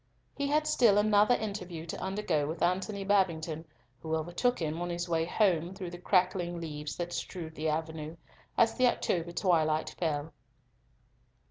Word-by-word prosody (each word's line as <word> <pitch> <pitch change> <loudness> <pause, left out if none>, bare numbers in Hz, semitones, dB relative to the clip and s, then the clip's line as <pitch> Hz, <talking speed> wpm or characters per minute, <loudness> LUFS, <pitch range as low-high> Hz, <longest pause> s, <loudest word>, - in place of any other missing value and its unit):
He 280 0 -1
had 305 +2 +2
still 240 -9 +4
another 210 +2 +5
interview 180 -6 -5
to 170 - -6
undergo 185 -7 0
with 160 +3 -3
Antony 195 +3 0
Babington, 170 -5 +1 0.4
who 160 0 -1
overtook 175 +10 0
him 160 0 -2
on 175 - -2
his 175 0 -3
way 165 -1 +1
home 175 -2 +1
through 185 -3 -6
the 175 - -8
crackling 180 -2 +1
leaves 150 -2 -5
that 175 0 -4
strewed 165 -4 -5
the 160 0 -2
avenue, 160 0 -3 0.4
as 230 -1 +5
the 255 - +3
October 175 -7 0
twilight 160 -4 +1
fell. 155 -2 -1
175 Hz, 155 wpm, -30 LUFS, 160-200 Hz, 0.4 s, another